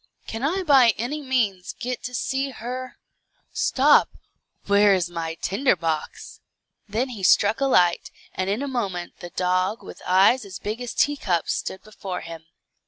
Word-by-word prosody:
Can 225 Hz, -, -6 dB
I 355 Hz, +8 st, 0 dB
by 265 Hz, -, +5 dB
any 275 Hz, +7 st, -3 dB
means 225 Hz, -9 st, -1 dB
get 250 Hz, +1 st, -4 dB
to 250 Hz, +1 st, -5 dB
see 270 Hz, +3 st, -1 dB
her. 255 Hz, +1 st, -7 dB, 0.5 s
Stop! 285 Hz, +3 st, +4 dB, 0.6 s
where 200 Hz, 0 st, +5 dB
is 175 Hz, -2 st, -2 dB
my 165 Hz, -1 st, -4 dB
tinder 200 Hz, +8 st, +1 dB
box?" 160 Hz, -2 st, -4 dB, 0.5 s
Then 235 Hz, +6 st, -1 dB
he 225 Hz, -6 st, -7 dB
struck 205 Hz, +5 st, +4 dB
a -, -, +3 dB
light, 175 Hz, -9 st, +3 dB, 0.2 s
and 185 Hz, +1 st, -2 dB
in 215 Hz, +7 st, -1 dB
a -, -, -3 dB
moment 195 Hz, -9 st, -4 dB
the 175 Hz, -, -8 dB
dog, 185 Hz, +4 st, 0 dB
with -, -, -11 dB
eyes 195 Hz, +7 st, +4 dB
as 190 Hz, -2 st, -8 dB
big 215 Hz, +5 st, -5 dB
as 245 Hz, -, -5 dB
teacups, 200 Hz, -, +1 dB
stood 190 Hz, -, -5 dB
before 195 Hz, -3 st, -6 dB
him. 165 Hz, -1 st, -10 dB
210 Hz, 165 wpm, -24 LUFS, 185-255 Hz, 0.6 s, by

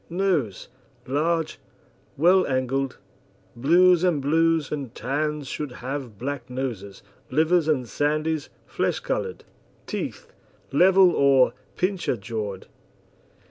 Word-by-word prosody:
NOSE 170 Hz, -, -1 dB, 0.4 s
Large, 160 Hz, +4 st, -1 dB, 0.6 s
well 180 Hz, +5 st, +4 dB
angled; 130 Hz, 0 st, -1 dB, 0.6 s
blues 175 Hz, +7 st, +4 dB
and 175 Hz, -5 st, +2 dB
blues 160 Hz, +2 st, +2 dB
and 140 Hz, -5 st, -5 dB
tans 150 Hz, 0 st, -2 dB
should 145 Hz, -2 st, -5 dB
have 130 Hz, -3 st, -6 dB
black 130 Hz, 0 st, -5 dB
noses, 115 Hz, -8 st, -5 dB, 0.3 s
livers 160 Hz, +3 st, +2 dB
and 140 Hz, -5 st, +1 dB
sandies 155 Hz, +4 st, -1 dB, 0.2 s
flesh -, -, -1 dB
coloured. -, -, -3 dB, 0.4 s
TEETH -, -, -5 dB, 0.4 s
Level 185 Hz, +5 st, +6 dB
or 135 Hz, -4 st, +4 dB, 0.2 s
pincher 185 Hz, -8 st, -1 dB
jawed. 100 Hz, -2 st, -5 dB
145 Hz, 100 wpm, -24 LUFS, 130-165 Hz, 0.6 s, Level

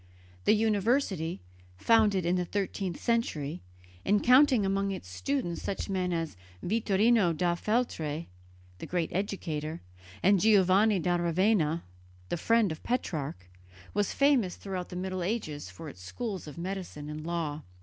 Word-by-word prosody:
The -, -, +6 dB
university, 210 Hz, -, +1 dB, 0.4 s
founded 210 Hz, -, +3 dB
in 175 Hz, +1 st, +2 dB
the 180 Hz, -, +1 dB
thirteenth 190 Hz, -1 st, -3 dB
century, 170 Hz, -, -1 dB, 0.4 s
and 205 Hz, +1 st, +2 dB
counting 255 Hz, -3 st, +6 dB
among 195 Hz, +1 st, 0 dB
its 190 Hz, -, -5 dB
students 140 Hz, -, -2 dB
such 200 Hz, -, -3 dB
men 185 Hz, -1 st, 0 dB
as 165 Hz, -5 st, -2 dB, 0.3 s
Vittorino 210 Hz, -1 st, +3 dB
da 175 Hz, +1 st, +2 dB
Feltre, 170 Hz, -7 st, -1 dB, 0.5 s
the -, -, -6 dB
great 175 Hz, -2 st, -1 dB
educator, 165 Hz, -5 st, -3 dB, 0.4 s
and 195 Hz, +1 st, +5 dB
Giovanni 200 Hz, +1 st, +5 dB
da 175 Hz, 0 st, +1 dB
Ravenna, 170 Hz, -1 st, +2 dB, 0.5 s
the -, -, -1 dB
friend 225 Hz, +2 st, +3 dB
of 160 Hz, -, -6 dB
Petrarch, 150 Hz, -, -3 dB, 0.5 s
was 205 Hz, -1 st, +1 dB
famous 270 Hz, -10 st, +3 dB
throughout 185 Hz, -2 st, -5 dB
the 180 Hz, -, -8 dB
Middle 185 Hz, 0 st, -3 dB
Ages 170 Hz, -, -3 dB
for 90 Hz, -, -10 dB
its 90 Hz, -, -10 dB
schools 195 Hz, -, -5 dB
of 150 Hz, -, -9 dB
medicine 175 Hz, -4 st, -5 dB
and 150 Hz, 0 st, -5 dB
of 155 Hz, -, -8 dB
law. 160 Hz, -3 st, -2 dB
185 Hz, 145 wpm, -29 LUFS, 160-210 Hz, 0.5 s, The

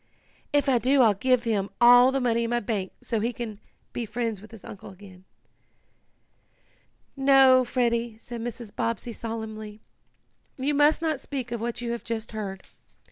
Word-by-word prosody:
"If 290 Hz, -1 st, +2 dB
I 255 Hz, -3 st, +3 dB
do 260 Hz, +2 st, +4 dB
I'll 220 Hz, -3 st, +5 dB
give 250 Hz, +4 st, +1 dB
him 205 Hz, -4 st, -1 dB
all 245 Hz, +2 st, +7 dB
the 270 Hz, -, 0 dB
money 235 Hz, -2 st, +1 dB
in -, -, -3 dB
my 240 Hz, 0 st, +1 dB
bank 200 Hz, -4 st, -3 dB
so 225 Hz, -, -1 dB
he 230 Hz, +3 st, 0 dB
can 220 Hz, -4 st, -7 dB, 0.3 s
be 240 Hz, -, -3 dB
friends 225 Hz, -2 st, -3 dB
with 215 Hz, -, -13 dB
his 225 Hz, -3 st, -13 dB
uncle 200 Hz, -, -10 dB
again." 190 Hz, -1 st, -15 dB, 1.9 s
"No, 270 Hz, -1 st, +6 dB
Freddie," 235 Hz, -2 st, -1 dB
said 235 Hz, +1 st, -8 dB
Mrs. 235 Hz, -2 st, -7 dB
Bobbsey 230 Hz, +1 st, -2 dB
solemnly. 220 Hz, -2 st, -6 dB, 0.8 s
"You 275 Hz, +3 st, 0 dB
must 295 Hz, +3 st, +3 dB
not 310 Hz, -4 st, 0 dB
speak 260 Hz, -3 st, -6 dB
of 235 Hz, -2 st, -3 dB
what 235 Hz, +1 st, -3 dB
you 235 Hz, -1 st, -3 dB
have 235 Hz, -, -4 dB
just 225 Hz, -1 st, -5 dB
heard. 200 Hz, -3 st, -6 dB
235 Hz, 170 wpm, -26 LUFS, 220-255 Hz, 1.9 s, all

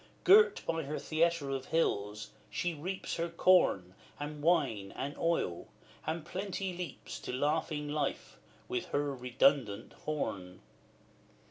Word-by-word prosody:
Girt 430 Hz, +2 st, +6 dB
by 165 Hz, 0 st, 0 dB
her 150 Hz, 0 st, -4 dB
theatre 160 Hz, -3 st, +1 dB
of 135 Hz, -1 st, -3 dB
hills, 105 Hz, -10 st, 0 dB, 0.2 s
she 175 Hz, -1 st, -1 dB
reaps 180 Hz, +5 st, -4 dB
Her 170 Hz, 0 st, -1 dB
corn, 170 Hz, -, +4 dB, 0.3 s
and 145 Hz, 0 st, -5 dB
wine, 140 Hz, -, +2 dB
and 140 Hz, +2 st, -4 dB
oil, 165 Hz, -, 0 dB, 0.4 s
and 160 Hz, 0 st, -2 dB
Plenty 190 Hz, +1 st, -3 dB
leaps 175 Hz, -5 st, -6 dB
To -, -, -5 dB
laughing 150 Hz, +2 st, 0 dB
life, 145 Hz, -1 st, -3 dB, 0.3 s
with 370 Hz, -1 st, -2 dB
her 145 Hz, 0 st, -1 dB
redundant 125 Hz, -3 st, +1 dB
horn. 95 Hz, -12 st, -3 dB
150 Hz, 125 wpm, -32 LUFS, 130-170 Hz, 0.4 s, Girt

